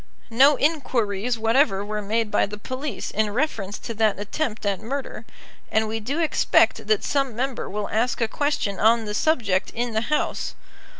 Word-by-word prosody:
No 275 +5 +6
inquiries 240 -7 0
whatever 225 -2 +2
were 210 0 -3
made 215 +1 -1
by - - +2
the 210 +1 -7
police 255 +2 -5
in 215 0 0
reference 215 -5 -2
to 230 - -6
that 215 -2 +1
attempt 215 +1 -3
at 200 -1 0
murder, 270 +5 -5 0.5
and 220 0 +2
we 220 +1 -2
do 255 +8 -3
expect 320 -2 +2
that 435 -2 +2
some 275 -5 0
member 255 +1 -3
will 210 0 -3
ask 230 +4 0
a 230 - +1
question 255 -7 -1
on 225 +1 +4
the 210 - -4
subject 210 - +1
in 240 0 -2
the 220 - +1
House. 300 - -1
225 Hz, 175 wpm, -24 LUFS, 210-270 Hz, 0.5 s, No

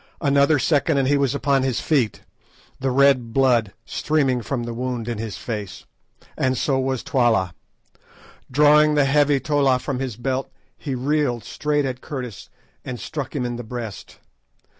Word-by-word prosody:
Another 140 0 +4
second 145 +2 +2
and 135 -1 +2
he 145 - +3
was 140 -1 +1
upon 140 -1 +2
his 130 -3 0
feet, 130 -9 0 0.6
the 135 - 0
red 130 -3 +3
blood 120 -6 +3
streaming 135 -5 0
from 120 +1 -3
the 120 0 -5
wound 125 -1 -3
in 120 -3 -3
his 110 -2 -5
face, 105 -5 -6 0.5
and 130 -1 0
so 135 +1 +1
was 130 -1 -1
Twala. 115 -9 +1 1.0
Drawing 150 +2 +5
the 145 -2 +4
heavy 145 0 +3
tolla 140 -1 +2
from 130 0 -4
his 130 -5 -3
belt, 130 +3 -2 0.3
he 140 -4 -4
reeled 130 -3 0
straight 150 +3 -1
at 130 -1 -4
Curtis 125 -8 -7 0.3
and 125 -2 -6
struck 145 -1 -5
him 130 -3 -1
in 120 -1 -3
the 120 - -6
breast. 115 -3 -7
130 Hz, 160 wpm, -22 LUFS, 120-140 Hz, 1.0 s, Drawing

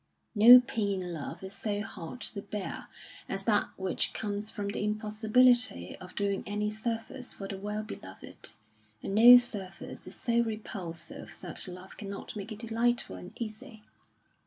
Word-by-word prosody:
No 235 +3 +10
pain 205 -5 -1
in 175 -1 -5
love 155 +3 -6
is 190 +1 -7
so 205 -2 -2
hard 210 +2 -8
to 200 - -3
bear 205 -1 -5 0.4
as 195 0 -1
that 205 0 +2
which 190 -2 -1
comes 205 0 -3
from 205 -2 -4
the 205 - -3
impossibility 215 - +2
of 185 0 -12
doing 200 -1 0
any 210 +1 -1
service 225 +3 -4
for 195 - -7
the 195 -1 -6
well 210 +2 -3
beloved, 95 - -10 0.5
and - - -3
no 240 +4 +10
service 205 -6 -3
is - - -9
so 235 -1 +1
repulsive 190 -7 -6
that 175 -1 -4
love 185 +1 -10
cannot 200 0 -7
make 205 +1 -6
it 215 - -5
delightful 235 - 0
and 90 -1 -10
easy. 220 0 -7
210 Hz, 160 wpm, -30 LUFS, 195-225 Hz, 0.5 s, No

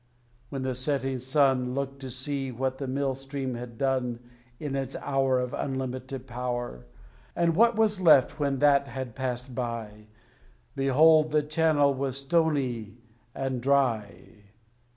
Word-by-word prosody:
When 135 -2 -4
the 130 0 -1
setting 135 0 -1
sun 130 -1 +2
Looked 140 0 -3
to 135 -1 -7
see 135 +1 -3
what 130 +2 -2
the 135 - -3
Mill 135 +1 -1
Stream 135 0 -5
had 120 -1 -8
done 130 -3 0 0.4
In 145 -3 -3
its 135 0 -3
hour 135 -2 +1
Of 125 -1 -3
unlimited 130 -1 -4
power, 120 - -4 0.5
And 170 -1 +2
what 230 +4 +5
was 215 -3 +2
left 150 -3 +5
when 140 -2 0
that 140 0 +4
had 130 -4 -6
passed 125 0 -4
by, 115 -3 -5 0.7
Behold 155 +4 +5
the 150 0 +2
channel 150 -2 +2
was 135 0 -2
stony 135 -8 0 0.4
and 130 -2 -2
dry. 120 -6 0
135 Hz, 140 wpm, -27 LUFS, 125-140 Hz, 0.7 s, what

